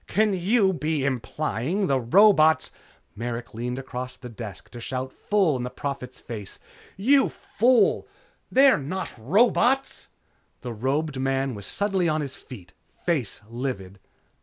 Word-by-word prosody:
"Can 215 Hz, +1 st, +2 dB
you 190 Hz, +2 st, +2 dB
be 155 Hz, -4 st, -1 dB
implying 135 Hz, -, -2 dB
that 185 Hz, -8 st, +2 dB
the 135 Hz, -, +3 dB
robots 160 Hz, -, +5 dB, 0.2 s
" -, -, -36 dB
Merrick 115 Hz, +1 st, -5 dB
leaned 120 Hz, +3 st, -3 dB
across 130 Hz, -1 st, -6 dB
the 125 Hz, -, -9 dB
desk 110 Hz, -4 st, -9 dB
to 120 Hz, -, -9 dB
shout 130 Hz, +2 st, -4 dB
full 195 Hz, -8 st, +1 dB
in -, -, -4 dB
the 125 Hz, -, -3 dB
Prophet's 130 Hz, -2 st, -5 dB
face: 105 Hz, -4 st, -7 dB, 0.4 s
"You 270 Hz, +8 st, +4 dB
fool! 245 Hz, +2 st, +2 dB, 0.4 s
They're 270 Hz, -, +6 dB
not 180 Hz, +7 st, -4 dB
robots!" 235 Hz, -, +2 dB, 0.5 s
The 120 Hz, -2 st, -5 dB
robed 135 Hz, +5 st, -1 dB
man 135 Hz, 0 st, 0 dB
was 100 Hz, -2 st, -7 dB
suddenly 195 Hz, -4 st, 0 dB
on 155 Hz, 0 st, 0 dB
his 140 Hz, -2 st, -4 dB
feet, 95 Hz, -8 st, -12 dB, 0.3 s
face 145 Hz, -, 0 dB
livid. 115 Hz, -6 st, -5 dB
135 Hz, 145 wpm, -25 LUFS, 120-190 Hz, 0.5 s, They're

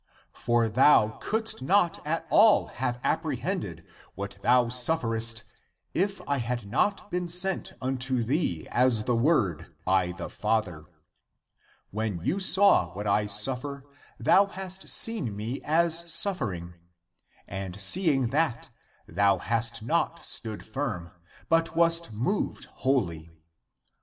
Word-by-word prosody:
For 120 Hz, -1 st, +1 dB
thou 110 Hz, -1 st, +4 dB
couldst 220 Hz, -7 st, -1 dB
not 180 Hz, +4 st, +1 dB
at 165 Hz, +2 st, -2 dB
all 215 Hz, 0 st, +5 dB
have 125 Hz, -2 st, -1 dB
apprehended -, -, -3 dB, 0.3 s
what 100 Hz, +1 st, -7 dB
thou 125 Hz, +1 st, +3 dB
sufferest 115 Hz, -4 st, +2 dB, 0.5 s
if 195 Hz, +3 st, -1 dB
I 140 Hz, -, 0 dB
had 120 Hz, -2 st, -3 dB
not 195 Hz, -, -1 dB
been 180 Hz, 0 st, -2 dB
sent 180 Hz, +3 st, -2 dB
unto 130 Hz, -1 st, -1 dB
thee 115 Hz, -, -1 dB
as 120 Hz, -3 st, +3 dB
the 120 Hz, +2 st, 0 dB
Word 110 Hz, -, 0 dB
by 95 Hz, -1 st, +1 dB
the 90 Hz, 0 st, -7 dB
Father. 105 Hz, -8 st, -2 dB, 1.1 s
When 105 Hz, -3 st, -3 dB
you 190 Hz, -, 0 dB
saw 190 Hz, -, +4 dB
what 105 Hz, +2 st, -5 dB
I 105 Hz, +1 st, +1 dB
suf 115 Hz, +6 st, +1 dB
fer, 140 Hz, -1 st, -7 dB, 0.4 s
thou 200 Hz, +1 st, +4 dB
hast 190 Hz, -1 st, -7 dB
seen 205 Hz, -, 0 dB
me 115 Hz, +6 st, -5 dB
as 170 Hz, +2 st, +2 dB
suffering; 110 Hz, -, 0 dB, 0.7 s
and 95 Hz, 0 st, -6 dB
seeing 135 Hz, -, +3 dB
that, 140 Hz, -3 st, -1 dB, 0.4 s
thou 100 Hz, -1 st, +2 dB
hast 115 Hz, +3 st, 0 dB
not 170 Hz, +5 st, -1 dB
stood 110 Hz, -2 st, -4 dB
firm, 110 Hz, -8 st, -5 dB, 0.4 s
but 165 Hz, 0 st, +1 dB
wast 170 Hz, -3 st, +3 dB
moved 125 Hz, -, -2 dB, 0.2 s
wholly. 85 Hz, -, -1 dB
125 Hz, 125 wpm, -27 LUFS, 105-165 Hz, 1.1 s, all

